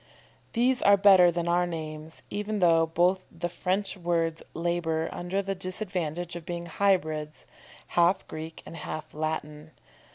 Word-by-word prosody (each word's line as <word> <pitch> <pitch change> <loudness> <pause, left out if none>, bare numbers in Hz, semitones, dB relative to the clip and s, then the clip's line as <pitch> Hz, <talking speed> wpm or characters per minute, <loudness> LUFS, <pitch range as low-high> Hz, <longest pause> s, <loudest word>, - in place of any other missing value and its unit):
_ - - -34
These 250 +2 +2
are 200 0 +6
better 190 -3 +7
than 170 0 -2
our 175 +1 +2
names, 155 -1 -7
even 210 +1 -2
though 165 -3 +4
both 180 +3 +1
the 175 +1 -4
French 190 +4 -1
words 165 -3 -1
labour 165 -1 -1
under 185 +3 -2
the 195 0 -2
disadvantage 180 -3 -3
of 170 - -6
being 175 0 -5
hybrids, 155 -5 0 0.4
half 175 +2 +2
Greek 160 +1 -8
and 165 - -9
half 155 -1 -6
Latin. 155 0 -4
175 Hz, 150 wpm, -28 LUFS, 160-185 Hz, 0.4 s, better